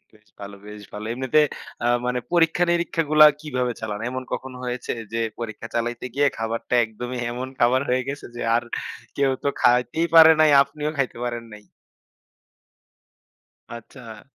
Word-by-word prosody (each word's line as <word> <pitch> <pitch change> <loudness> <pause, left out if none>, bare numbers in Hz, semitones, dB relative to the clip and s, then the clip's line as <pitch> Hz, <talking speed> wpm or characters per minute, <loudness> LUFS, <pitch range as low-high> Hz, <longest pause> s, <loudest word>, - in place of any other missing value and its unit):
বেশ 105 0 -26
ভালো, 100 0 -8
বেশ 105 0 -10
ভালো। 105 +1 -6
এমনিতে 130 +4 +1 0.5
আ - - +3 0.2
মানে 125 0 0
পরীক্ষা-নিরীক্ষাগুলা 165 -2 +3 0.2
কিভাবে 125 -5 -2
চালান? 105 -2 -4
এমন 130 0 -5
কখন 130 0 -5
হয়েছে 125 0 -4 0.2
যে, 115 - -1 0.2
পরীক্ষা 115 0 -6
চালাইতে 120 +1 -2
গিয়ে 145 0 +3
খাবারটা 115 +2 -2
একদমই 120 +3 -6
এমন 125 +2 -5
খাবার 125 +3 +3
হয়ে 125 +1 +2
গেছে 140 +1 -5
যে, - - -6
আর 120 - +1 0.5
কেউ 140 -1 +2
তো - - 0
খাইতেই 125 +7 +2
পারে 160 0 +10
নাই, 155 -1 +6
আপনিও 150 +2 -3
খাইতে 135 -3 -1
পারেন 120 -1 -4
নাই? 105 - -12 2.1
আচ্ছা। 115 -2 -11
125 Hz, 145 wpm, -23 LUFS, 115-145 Hz, 2.1 s, পারে